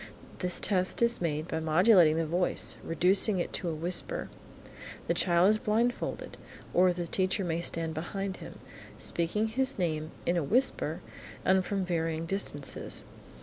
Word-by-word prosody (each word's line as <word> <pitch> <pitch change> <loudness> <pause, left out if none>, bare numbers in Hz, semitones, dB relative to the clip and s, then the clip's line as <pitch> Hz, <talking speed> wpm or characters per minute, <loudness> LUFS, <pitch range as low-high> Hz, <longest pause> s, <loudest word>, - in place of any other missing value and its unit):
This 180 -1 +3
test 185 +3 +1
is 235 -3 +2
made 155 -1 -2
by 160 - -2
modulating 165 0 +5
the 165 - 0
voice, 175 +3 0
reducing 190 +5 +2
it 175 - -3
to 175 - -2
a 160 - -3
whisper. 175 - -2 0.7
The - - +1
child 175 +2 +3
is 215 - +1
blindfolded, 230 +4 -1 0.4
or 180 +1 +5
the 175 0 -3
teacher 185 +3 0
may 165 0 -1
stand 165 -1 -2
behind 190 +4 -4
him, - - -10 0.4
speaking 175 +6 -1
his 265 +4 0
name, 155 -4 -1 0.2
in 175 - +1
a 170 - 0
whisper 245 - 0 0.4
and 190 0 +4
from 195 0 -2
varying 165 -2 -2
distances. 165 -6 -1
180 Hz, 150 wpm, -29 LUFS, 165-195 Hz, 0.7 s, modulating